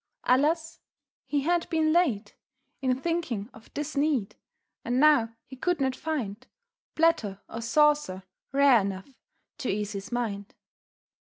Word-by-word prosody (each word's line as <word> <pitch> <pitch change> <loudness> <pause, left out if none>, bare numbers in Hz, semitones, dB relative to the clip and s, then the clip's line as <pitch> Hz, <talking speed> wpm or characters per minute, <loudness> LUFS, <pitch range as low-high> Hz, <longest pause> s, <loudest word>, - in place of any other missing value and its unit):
Alas! 315 +6 +2 0.5
He 290 -1 0
had 340 +3 0
been 315 -1 +2
late 280 - +1 0.5
In 255 -1 +1
thinking 270 -9 -2
of 225 - -16
this 300 +1 -4
need, 280 -8 0 0.5
and 245 +2 0
now 275 -7 +4
he 265 - -11
could 355 +6 0
not 265 -1 0
find 255 -7 -4 0.5
Platter 235 -12 +2
or 225 - -6
saucer 290 -6 +2 0.3
rare 275 -4 +5
enough 195 +6 -5 0.5
to 260 - -2
ease 210 +1 -1
his 200 +1 -6
mind. 210 -5 -3
260 Hz, 130 wpm, -27 LUFS, 215-305 Hz, 0.5 s, rare